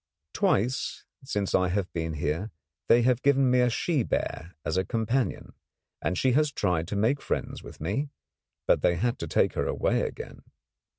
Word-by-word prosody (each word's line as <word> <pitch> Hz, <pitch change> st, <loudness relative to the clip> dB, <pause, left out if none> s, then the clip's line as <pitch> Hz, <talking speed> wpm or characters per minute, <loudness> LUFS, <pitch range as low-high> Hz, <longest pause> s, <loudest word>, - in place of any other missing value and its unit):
Twice 125 Hz, +7 st, 0 dB, 0.2 s
since 105 Hz, -7 st, -2 dB
I 95 Hz, 0 st, +3 dB
have 95 Hz, +1 st, -2 dB
been 80 Hz, -1 st, -2 dB
here 75 Hz, +7 st, -2 dB, 0.4 s
they 120 Hz, 0 st, +5 dB
have 125 Hz, 0 st, +2 dB
given 135 Hz, -2 st, +4 dB
me 125 Hz, -, +4 dB
a 125 Hz, 0 st, +4 dB
she 150 Hz, +5 st, 0 dB
bear 90 Hz, -5 st, -3 dB
as -, -, -1 dB
a 95 Hz, -, +2 dB
companion, 115 Hz, +4 st, -1 dB, 0.5 s
and 85 Hz, +4 st, -1 dB
she 130 Hz, -, +3 dB
has 150 Hz, +3 st, +3 dB
tried 90 Hz, -, 0 dB
to 100 Hz, -, -3 dB
make 115 Hz, +8 st, +1 dB
friends -, -, -3 dB
with -, -, -12 dB
me; 105 Hz, -, -2 dB, 0.6 s
but -, -, +3 dB
they 85 Hz, -, +3 dB
had 120 Hz, +7 st, -1 dB
to 85 Hz, -, -4 dB
take 75 Hz, -, +2 dB
her -, -, -1 dB
away -, -, +1 dB
again. -, -, -6 dB
110 Hz, 180 wpm, -27 LUFS, 90-130 Hz, 0.6 s, they